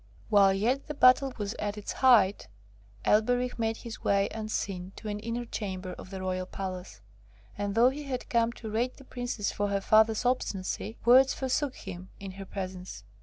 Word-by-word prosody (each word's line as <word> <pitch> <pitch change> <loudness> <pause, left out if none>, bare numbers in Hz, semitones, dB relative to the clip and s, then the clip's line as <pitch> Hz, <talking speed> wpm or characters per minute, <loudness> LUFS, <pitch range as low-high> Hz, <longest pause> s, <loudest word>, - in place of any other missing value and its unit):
While 200 -3 +6
yet 245 +8 0
the 300 - -5
battle 265 +1 +5
was 205 -1 -3
at 210 0 -2
its 210 - -5
height, 225 -7 +4 0.6
Elberich 245 +3 +2
made 225 0 0
his 230 -2 -9
way, 200 0 +2
unseen, 195 -4 -4
to 215 - -7
an 205 0 -3
inner 230 +3 -4
chamber 185 -5 -5
of - - -10
the 190 -1 -6
Royal 185 0 -2
Palace, 185 - -6 0.5
and 205 0 -3
though 235 +2 +6
he 290 +2 -6
had 255 -2 -4
come 235 -1 +2
to 220 -3 -8
rate 240 +4 -1
the 270 - -13
Princess 245 -5 -3
for 205 - -1
her 200 0 0
father's 220 +3 +4
obstinacy, 215 -3 -1
words 260 +3 +6
forsook 265 +1 -1
him 185 -1 -8
in 195 -1 -7
her 195 +1 -8
presence. 185 - -6
215 Hz, 180 wpm, -29 LUFS, 195-245 Hz, 0.6 s, While